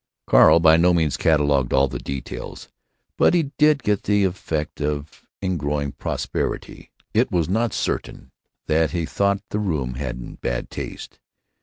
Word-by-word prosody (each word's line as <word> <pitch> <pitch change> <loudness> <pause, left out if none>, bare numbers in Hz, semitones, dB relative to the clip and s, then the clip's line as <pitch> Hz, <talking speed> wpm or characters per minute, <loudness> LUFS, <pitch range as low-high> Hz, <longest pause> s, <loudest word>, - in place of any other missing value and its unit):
Carl 85 - +6
by 80 -1 +6
no 90 +1 +4
means 80 -4 +1
catalogued 75 -5 +2
all 65 +1 +4
the - - -6
details, 70 -1 -7 0.5
but - - +5
he 155 -5 0
did 150 -2 +4
get 105 -1 +1
the 105 0 +2
effect 80 -5 -3
of 75 +1 -4 0.2
ingrowing 75 -6 -1
propriety. 65 - -4 0.2
It - - +3
is 85 -4 +1
not 110 +5 0
certain 65 - -4 0.3
that 80 +1 +2
he 85 -3 -2
thought 100 +4 0
the 105 - -1
room 75 -11 -2
in 60 -3 -6
bad - - -3
taste. - - -7
80 Hz, 150 wpm, -22 LUFS, 70-100 Hz, 0.5 s, Carl